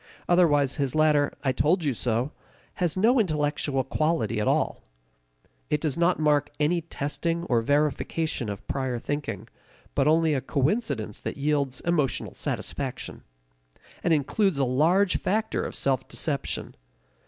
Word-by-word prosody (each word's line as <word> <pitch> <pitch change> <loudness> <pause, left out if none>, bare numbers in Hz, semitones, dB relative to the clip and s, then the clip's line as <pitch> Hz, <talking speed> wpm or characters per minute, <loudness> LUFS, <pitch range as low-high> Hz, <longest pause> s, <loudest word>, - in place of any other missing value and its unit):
Otherwise 145 -6 +3
his 140 -2 -1
later 150 -2 +3
"I 135 - +2
told 155 +8 +2
you 145 -3 +1
so" 120 +4 -1 0.5
has 175 0 +1
no 235 +6 +4
intellectual 150 -6 0
quality 155 -4 0
at - - -1
all; - - +1 0.9
it 150 - +1
does 150 -3 -1
not 170 +1 +2
mark 150 -2 +2
any 165 +3 +2
testing 165 +2 -3
or 120 -8 +1
verification 145 -1 0
of 100 -1 -7
prior 130 -3 -2
thinking, 145 +5 -4 0.5
but 140 +1 +2
only 160 0 +4
a 135 - 0
coincidence 140 - -1
that - - -5
yields 140 -2 0
emotional 155 -6 0
satisfaction - - -4 0.8
and 175 - +1
includes 160 +4 +2
a 135 - +2
large 165 +10 +3
factor 220 +3 0
of - - -5
self 135 -2 0
deception. 140 -4 -2
150 Hz, 140 wpm, -26 LUFS, 135-165 Hz, 0.9 s, no